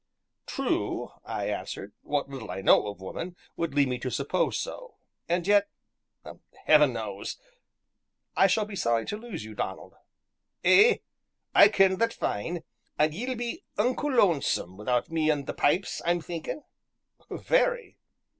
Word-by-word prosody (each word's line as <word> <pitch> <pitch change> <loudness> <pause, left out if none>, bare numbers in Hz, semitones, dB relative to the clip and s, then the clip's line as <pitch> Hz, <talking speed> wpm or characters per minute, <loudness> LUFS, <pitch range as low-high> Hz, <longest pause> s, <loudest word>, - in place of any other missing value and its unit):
"True," - - -1
I - - -4
answered, 100 +1 -5
"what 145 -1 -1
little 135 -5 -8
I 95 - -4
know 95 - +5
of 100 -2 -7
woman 170 - -6 0.2
would 165 -4 -3
lead 140 -1 +4
me 125 -1 -2
to 130 - -3
suppose 140 +8 0
so; - - -6 0.3
and 175 0 +1
yet 205 0 +4 1.0
Heaven 150 -4 +6
knows! 105 -4 -5 1.0
I 195 - +6
shall 210 +3 +2
be 210 -1 -8
sorry 115 -10 +1
to - - -3
lose 215 - -7
you, 110 - -9
Donald." - - -5 0.7
"Ay 450 +3 +6 0.5
I - - +9
ken 190 -1 +3
that 230 +3 +1
fine, 165 +12 -3 0.3
an' 155 +1 +3
ye'll 250 +9 -3
be 240 0 -4
unco 250 +6 +1
lonesome 170 - +2
wi'out 120 - -1
me 160 -1 +1
an' 145 -2 +1
the - - -4
pipes, 175 +7 +1
I'm 175 +1 +2
thinkin'." 170 - -6 0.7
"Very!" - - 0
165 Hz, 145 wpm, -28 LUFS, 130-210 Hz, 1.0 s, I